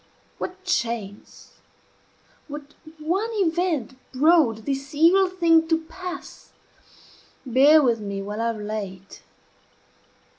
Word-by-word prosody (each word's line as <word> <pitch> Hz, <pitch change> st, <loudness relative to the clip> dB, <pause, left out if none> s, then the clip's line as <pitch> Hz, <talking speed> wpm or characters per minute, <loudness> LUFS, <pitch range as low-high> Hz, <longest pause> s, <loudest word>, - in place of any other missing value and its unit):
What 375 Hz, +1 st, -6 dB
chance 230 Hz, -, -4 dB, 0.9 s
what 295 Hz, -1 st, -9 dB, 0.2 s
one 360 Hz, +9 st, -1 dB
event 345 Hz, -, 0 dB, 0.2 s
brought 265 Hz, -6 st, +3 dB
this 275 Hz, +1 st, -4 dB
evil 360 Hz, +5 st, +5 dB
thing 330 Hz, -3 st, +3 dB
to 325 Hz, -1 st, +2 dB
pass, 360 Hz, +3 st, -9 dB, 0.9 s
bear 280 Hz, +5 st, +5 dB
with 235 Hz, -3 st, +2 dB
me 200 Hz, -2 st, -5 dB
while 210 Hz, +2 st, -5 dB
I 230 Hz, -, +1 dB
relate. 205 Hz, -3 st, -6 dB
295 Hz, 100 wpm, -24 LUFS, 225-340 Hz, 0.9 s, evil